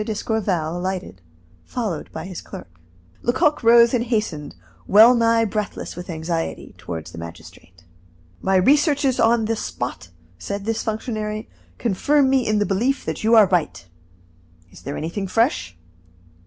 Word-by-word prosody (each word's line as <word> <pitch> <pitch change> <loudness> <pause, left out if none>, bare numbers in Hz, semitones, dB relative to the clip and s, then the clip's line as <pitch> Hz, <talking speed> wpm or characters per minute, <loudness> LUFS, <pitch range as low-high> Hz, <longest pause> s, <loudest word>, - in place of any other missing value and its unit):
d'Escorval 200 -6 -2
alighted, 180 - -4 0.4
followed 210 - -4
by 160 - -6
his 185 -2 -7
clerk. 90 -2 -11 0.4
Lecoq 300 +5 +1
rose 235 +1 +6
and 240 -1 +1
hastened, 210 - -2 0.3
well 220 +4 +8
nigh 230 -1 +3
breathless 210 0 -4
with 175 +1 -8
anxiety, 165 0 -4
toward 85 -3 -6
the 85 - -10
magistrate. 85 +2 -12 0.6
"My 190 0 +1
researches 280 - +3
on 230 0 +3
the 225 +1 0
spot," 85 - -5 0.3
said 200 - -5
this 225 0 -1
functionary, 215 -1 -4 0.3
"confirm 265 +6 +2
me 265 -2 +2
in 215 0 +2
the 205 - +2
belief 235 +8 0
that - - -4
you 225 +2 +4
are 220 -2 +8
right. 175 - -1 0.9
Is - - -15
there 140 +2 -5
anything 185 +5 -4
fresh?" 90 - 0
210 Hz, 140 wpm, -22 LUFS, 165-230 Hz, 0.9 s, well